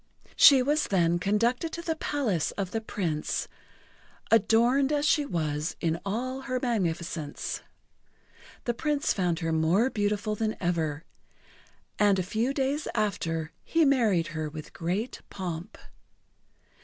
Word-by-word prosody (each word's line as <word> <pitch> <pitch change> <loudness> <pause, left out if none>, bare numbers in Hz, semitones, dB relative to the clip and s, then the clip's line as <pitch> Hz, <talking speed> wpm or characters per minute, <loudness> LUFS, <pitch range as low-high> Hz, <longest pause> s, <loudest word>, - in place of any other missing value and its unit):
She 270 -3 +8
was 295 +3 +1
then 175 -3 +2
conducted 230 - +1
to 340 - -5
the 325 -1 -1
palace 255 - -1
of 195 -2 -3
the 225 - -2
Prince, 170 -8 -2 0.8
adorned 235 +6 +4
as 295 -1 +1
she 295 -1 +3
was 155 - -2
in 165 -1 0
all 255 +6 -3
her 255 -1 -2
magnificence. 170 - -2 1.0
The 240 - 0
Prince 295 +4 0
found 180 -3 0
her 165 0 -1
more 170 +11 +2
beautiful 210 0 0
than 215 +1 -2
ever, 165 -3 -1 1.0
and 205 -2 +4
a 185 - 0
few 220 +7 -1
days 275 +2 -1
after 165 -7 -1
he 330 -1 +2
married 220 - +3
her 155 -1 -3
with 155 0 -9
great 185 +9 -3
pomp. 180 0 -6
205 Hz, 130 wpm, -28 LUFS, 170-255 Hz, 1.0 s, She